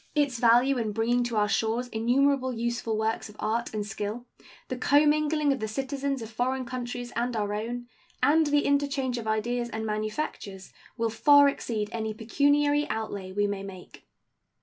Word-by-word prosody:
Its 285 -5 +1
value 245 +3 +4
in 220 -2 -1
bringing 235 +3 +1
to 240 -1 -3
our 210 0 +3
shores 225 +4 0
innumerable 260 +4 +2
useful 235 -2 -2
works 220 0 -1
of 210 - -14
art 225 +2 -1
and 210 -1 -3
skill, 210 +3 -5 0.4
the 255 - -3
commingling 295 +2 +3
of 270 - -5
the 220 - -2
citizens 270 +2 -3
of 225 - -9
foreign 255 +3 -1
countries 245 0 -5
and 240 +1 -1
our 205 -1 -1
own, 240 +3 -4 0.4
and 315 +1 +4
the 290 0 +2
interchange 280 -3 0
of 225 - -7
ideas 235 +3 -1
and 220 -1 -4
manufactures 215 -2 -4 0.2
will 230 -1 0
far 285 +5 +6
exceed 225 -6 -2
any 220 -2 -3
pecuniary 290 +5 +2
outlay 210 -3 -4
we 205 +2 +1
may 200 -1 -2
make. 190 -2 -11
240 Hz, 170 wpm, -27 LUFS, 220-275 Hz, 0.4 s, far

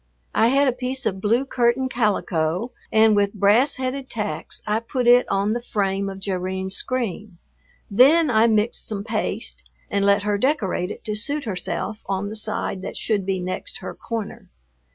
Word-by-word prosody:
I 225 - +4
had 275 +3 +3
a - - +4
piece 255 +2 -4
of 190 0 -1
blue 230 +6 +2
curtain 250 0 +1
calico 205 -4 0 0.2
and 220 -1 +5
with 205 0 +1
brass 215 +8 +4
headed 260 0 -4
tacks 210 -3 -4
I 210 +1 +1
put 245 +2 -3
it 245 +1 +6
on 200 +2 +1
the 240 - -2
frame 195 -3 -1
of 195 - -7
Jerrine's 190 0 -2
screen, 220 -7 -3 0.5
then 280 +8 +5
I 220 0 +5
mixed 220 +1 0
some 205 -2 -4
paste 215 0 -3 0.3
and 200 0 +1
let 200 0 +4
her 205 -1 0
decorate 205 - 0
it - - -8
to 215 - -2
suit 285 +8 -2
herself 215 0 -3
on 195 +1 -2
the 215 - -6
side 215 -3 -2
that - - -6
should 205 -4 -1
be 190 -1 0
next 185 - -4
her - - -7
corner. 225 -3 -6
215 Hz, 175 wpm, -23 LUFS, 200-245 Hz, 0.5 s, it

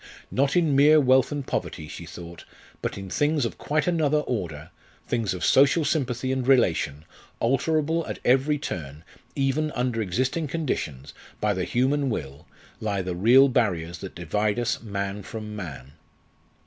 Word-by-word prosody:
Not 140 +2 +1
in 165 -5 +3
mere 150 +3 +7
wealth 130 -1 +4
and 145 -2 -3
poverty, 80 - -3
she 85 +2 -9
thought, 85 -1 -10 0.4
but - - -3
in 95 -1 -7
things 145 - +1
of 115 - -5
quite 150 0 0
another 155 -4 +2
order 80 - -4 0.3
things 115 -5 -1
of 90 - -2
social 140 +4 +4
sympathy 130 -4 -1
and 130 -1 -1
relation 80 - +2 0.3
alterable 155 +6 +1
at - - -4
every 135 +4 +3
turn, 80 - -6 0.3
even 140 +3 +1
under 125 -2 -1
existing 130 - -1
conditions, 80 - -3 0.3
by 105 -1 +1
the 90 -2 -2
human 135 +5 +1
will, 70 - -5 0.3
lie 100 -4 -1
the 90 -1 -3
real 120 +9 +6
barriers 90 -10 0
that 95 - -8
divide 105 +6 -1
us 120 0 -1
man 100 -2 -4
from 105 +1 -7
man. 70 -10 -7
120 Hz, 155 wpm, -25 LUFS, 90-140 Hz, 0.4 s, mere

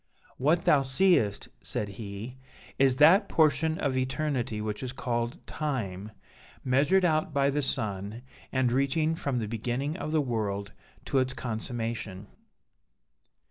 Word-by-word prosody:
'What 160 +6 +2
thou 145 - +5
seest,' 135 - +2
said 105 - -3
he, 100 +4 -7 0.4
'is 135 -1 +4
that 160 - +6
portion 160 0 +3
of 140 -3 -1
eternity 130 -3 -1
which 105 0 -3
is 130 -1 -4
called 120 -2 -2
Time, 110 -9 -3 0.5
measured 145 +9 +3
out 155 -3 +1
by 140 0 +3
the 145 +1 0
sun, 105 -3 -2 0.3
and 130 -2 +1
reaching 140 +5 +1
from 140 -5 -2
the 110 -3 -2
beginning 120 +7 -2
of 155 - -4
the 160 - +2
world 105 -7 -2 0.3
to 135 - +1
its 130 0 0
consummation.' 115 -4 -4
130 Hz, 135 wpm, -28 LUFS, 110-145 Hz, 0.5 s, that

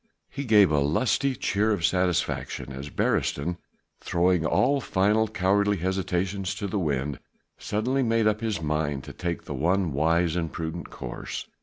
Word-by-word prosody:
He 140 0 -5
gave 105 -7 +6
a 75 - +3
lusty 125 - +1
cheer 105 -1 +1
of 95 -6 +1
satisfaction 90 -6 0
as 70 +2 -7
Beresteyn, 85 +4 0 0.4
throwing 90 -2 +1
all 140 +2 +2
final 105 +2 +2
cowardly 100 0 +1
hesitations 95 +1 -1
to - - -4
the 100 +1 -1
wind, 70 -4 -1 0.4
suddenly 125 +6 0
made 115 -2 +2
up 110 0 +2
his 110 -6 -1
mind 75 -2 -1
to - - -9
take 85 -2 -3
the - - -6
one 85 +4 +1
wise 85 +3 +2
and 85 -3 -2
prudent 85 +1 -5
course. - - -6
90 Hz, 155 wpm, -26 LUFS, 80-105 Hz, 0.4 s, gave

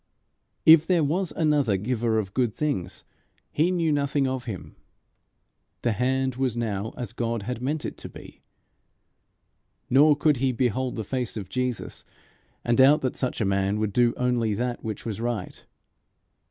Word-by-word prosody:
If 160 0 +8
there 175 -4 +3
was 170 +5 0
another 145 - +1
giver 115 +2 -1
of 100 -3 -2
good 120 -4 0
things 95 - -3 0.5
he 160 +4 +2
knew 170 -3 +1
nothing 140 -1 +1
of 130 -1 -3
him. 105 -7 -7 1.1
The 120 - +2
hand 130 +2 0
was 130 -3 -1
now 110 -2 -3
as 120 -2 -5
God 115 -2 -2
had 125 +2 -4
meant 145 +4 -2
it - - -5
to - - -9
be. - - -13 1.5
Nor 145 +3 +6
could 150 -1 +2
he 130 +1 +1
behold 125 +1 -1
the 110 - -3
face 125 +1 -3
of 95 -3 -6
Jesus, 125 -2 -3 0.6
and 120 0 +1
doubt 145 +4 +6
that 130 - -2
such 125 -2 -2
a - - +2
man 95 +1 +1
would 105 -2 -1
do 120 +1 +3
only 120 -4 0
that 120 +2 -3
which 110 -1 -5
was 110 -1 -4
right. 115 -5 -4
125 Hz, 165 wpm, -25 LUFS, 110-140 Hz, 1.5 s, If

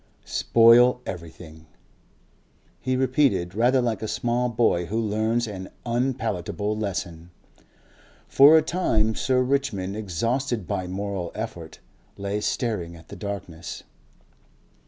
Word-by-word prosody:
"Spoil 120 +2 +5
everything," 80 -3 -9 1.1
he 130 0 -1
repeated, 130 - +1
rather 125 +5 +3
like 115 -4 -1
a 110 - -3
small 120 +2 0
boy 110 -7 +1
who 110 +5 -1
learns 110 +2 0
an 95 -4 -7 0.2
unpalatable 115 -5 -1
lesson. 90 -5 -4 1.0
For 145 +4 +7
a 155 - +3
time 110 -11 +1
Sir 125 +2 +1
Richmond, 125 -8 -1
exhausted 110 +3 -2
by 95 -3 -2
moral 95 -1 -4
effort, 90 -7 -7 0.4
lay 100 +1 -3
staring 100 -8 -2
at 80 - -16
the - - -8
darkness. 95 -5 -7
110 Hz, 115 wpm, -24 LUFS, 95-120 Hz, 1.1 s, For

